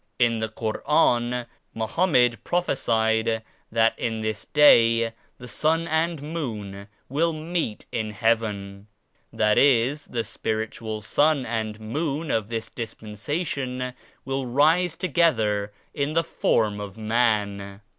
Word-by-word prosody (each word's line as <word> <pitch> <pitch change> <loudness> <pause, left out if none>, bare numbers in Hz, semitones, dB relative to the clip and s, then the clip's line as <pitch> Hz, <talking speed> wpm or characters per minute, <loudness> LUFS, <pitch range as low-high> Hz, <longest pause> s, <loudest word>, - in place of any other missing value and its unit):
In 115 -2 +2
the 110 0 -2
Koran 120 +1 +1 0.3
Mo 110 0 -1
hammed 125 - +2
prophesied 110 -9 +1 0.3
that 115 0 +2
in 115 -2 -2
this 110 -1 -3
Day 115 -6 +5 0.2
the 125 - -10
Sun 160 +5 0
and 160 -1 0
Moon 105 -11 -5 0.2
will 165 +5 +1
meet 155 -7 -3
in 110 -2 -2
Heaven; 105 -3 -1 0.4
that 105 0 +3
is 140 +2 +3
the 115 -1 -3
spiritual 110 0 -4
Sun 145 0 +2
and 110 -2 -3
Moon 145 +7 -2
of 110 -2 0
this 115 -1 -3
Dispensation 125 - -4 0.3
will 135 -1 -2
rise 160 +7 +3
to 185 - -3
gether 110 - +2 0.2
in 145 +1 -1
the 165 +1 +2
form 105 -9 0
of 100 -1 -7
man. 105 -3 0
115 Hz, 125 wpm, -25 LUFS, 110-145 Hz, 0.4 s, Day